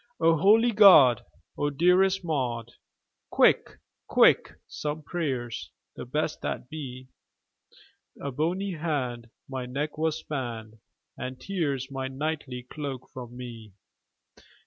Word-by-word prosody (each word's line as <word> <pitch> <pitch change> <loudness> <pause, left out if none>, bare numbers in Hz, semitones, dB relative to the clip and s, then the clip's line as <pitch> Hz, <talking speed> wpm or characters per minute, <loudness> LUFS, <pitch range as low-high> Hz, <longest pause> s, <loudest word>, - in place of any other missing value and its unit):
"O 165 0 +4
holy 220 +8 +5
God! 180 - +7 0.4
O 145 - +1
dearest 180 +5 +3
Maud, 120 -7 -2 0.6
Quick, - - +4 0.4
quick, - - +4
some 150 +1 -4
prayers, 135 -8 -3 0.3
the - - -7
best - - -2
that - - -4
be! 130 -4 -8 1.1
A 140 - -4
bony 175 +8 -1
hand 135 -8 -3 0.2
my 130 -2 -5
neck 145 +4 -2
has 160 -1 +1
spanned, 115 -6 -6 0.4
And 130 0 -6
tears 140 -9 -2
my 135 -1 -3
knightly 135 -2 -4
cloak 135 -1 -7
from 125 -1 -9
me!" 115 -5 -9
140 Hz, 115 wpm, -27 LUFS, 125-160 Hz, 1.1 s, God